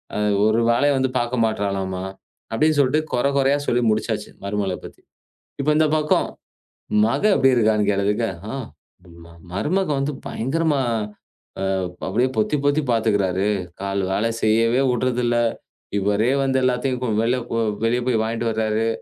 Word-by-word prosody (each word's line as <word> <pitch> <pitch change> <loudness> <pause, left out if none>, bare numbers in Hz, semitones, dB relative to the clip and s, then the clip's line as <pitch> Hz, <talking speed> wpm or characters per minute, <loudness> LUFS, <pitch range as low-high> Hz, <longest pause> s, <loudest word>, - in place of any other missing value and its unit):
அ - - -1 0.3
ஒரு 110 +2 +3
வேலையையும் 140 +4 +3
வந்து 130 -1 0
பாக்க 120 +1 -2
மாட்டுறாளாம்மா!" 100 -3 -2 0.5
அப்டின்னு 155 +5 +2
சொல்ட்டு 140 +4 +2
கொற 125 +2 +2
கொறையா 135 +1 +3
சொல்லி 120 0 +2
முடிச்சாச்சு. 110 0 -2 0.2
மருமகளப் 100 -2 -2
பத்தி. - - -12 0.6
இப்ப 150 +2 +2
இந்தப் 155 0 +3
பக்கம், 150 0 +1 0.8
மக 115 - -1
எப்படி 135 -1 +4
இருக்கான்னு? 110 -3 +2
கேட்டதுக்கு 105 +3 0 0.3
"ஆ, - - -6 0.6
ம்ம 85 - -14 0.3
மருமகன் 155 - 0
வந்து 140 +2 -1
பயங்கரமா 150 +3 0 0.8
அ - - -1 0.5
அப்டியே 120 +6 +1
பொத்தி 110 +7 +1
பொத்தி 145 +2 +3
பாத்துக்கிறாரு. 100 -4 +1 0.3
கால் 100 0 -1
வேலை 110 +4 +1
செய்யவே 115 +3 +3
உட்றது 125 0 0
இல்ல. 120 0 +1 0.6
இவரே 105 +5 +1
வந்து 135 -1 +1
எல்லாத்தையும் 125 0 0
கு - - 0
வெளில 120 +3 +2
கு 115 - -2 0.3
வெளிய 120 +2 +2
போய் 115 -3 +2
வாங்கிட்டு 115 +1 -2
வர்றாரு. 110 0 0
120 Hz, 145 wpm, -22 LUFS, 105-135 Hz, 0.8 s, எப்படி